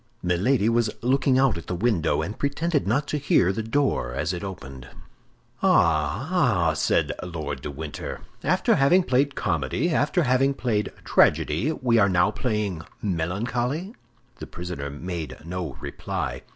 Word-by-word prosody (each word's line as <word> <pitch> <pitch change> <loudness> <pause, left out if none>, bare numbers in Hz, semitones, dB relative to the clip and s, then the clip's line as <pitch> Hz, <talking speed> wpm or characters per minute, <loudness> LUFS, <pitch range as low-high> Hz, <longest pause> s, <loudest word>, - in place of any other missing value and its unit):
Milady 100 +7 +2
was 115 -1 +2
looking 130 +1 +3
out 130 -9 +3
at - - -12
the 90 - -2
window, 85 -6 +1
and 100 +7 -6
pretended 145 - 0
not 140 +8 +1
to 150 - -1
hear 95 -9 +3
the 110 - -2
door 115 - 0
as 75 +6 -1
it 85 - -5
opened. 70 -9 -8 0.7
"Ah, - - +2
ah!" - - +2
said - - +1
Lord 75 -6 -5
de - - -5
Winter, 75 0 -6 0.2
"after - - +2
having 175 +7 +4
played 135 0 +1
comedy, 80 - -1
after 155 +3 +2
having 135 +1 +2
played 110 -6 -1
tragedy, 145 +9 +3
we 120 -6 +2
are 100 -1 +4
now 90 +2 +3
playing 105 -6 -2 0.2
melancholy?" 120 - -2 0.4
The - - -8
prisoner 85 -5 -6
made 80 +2 -6
no 90 0 -5
reply. - - -4
105 Hz, 150 wpm, -25 LUFS, 85-135 Hz, 0.7 s, having